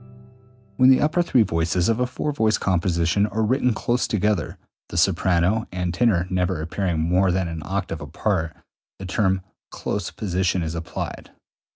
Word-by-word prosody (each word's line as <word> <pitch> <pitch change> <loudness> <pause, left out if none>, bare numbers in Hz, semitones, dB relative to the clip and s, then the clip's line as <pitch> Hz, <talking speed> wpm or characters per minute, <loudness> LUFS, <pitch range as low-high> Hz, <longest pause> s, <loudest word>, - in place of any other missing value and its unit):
When 130 0 +6
the 130 - +6
upper 155 +4 +2
three 130 -9 +3
voices 85 -1 0
of 115 +1 +1
a 125 - +1
four 150 +4 -3
voice 110 -6 +1
composition 90 +1 +1
are 110 +1 -1
written 125 +3 +2
close 120 +2 0
together 105 -1 0 0.3
(the - - -5
soprano 90 +4 +2
and 90 -1 -2
tenor 90 -4 +2
never 90 -2 0
appearing 85 +1 -2
more 90 +4 +2
than 90 0 0
an 80 -1 -5
octave 95 -4 -3
apart), 80 +2 -2 0.4
the 95 - -8
term 95 -1 0 0.3
close 100 -3 -3
position 95 -3 -1
is 80 0 -3
applied. 85 -1 -6
95 Hz, 160 wpm, -23 LUFS, 85-110 Hz, 0.4 s, When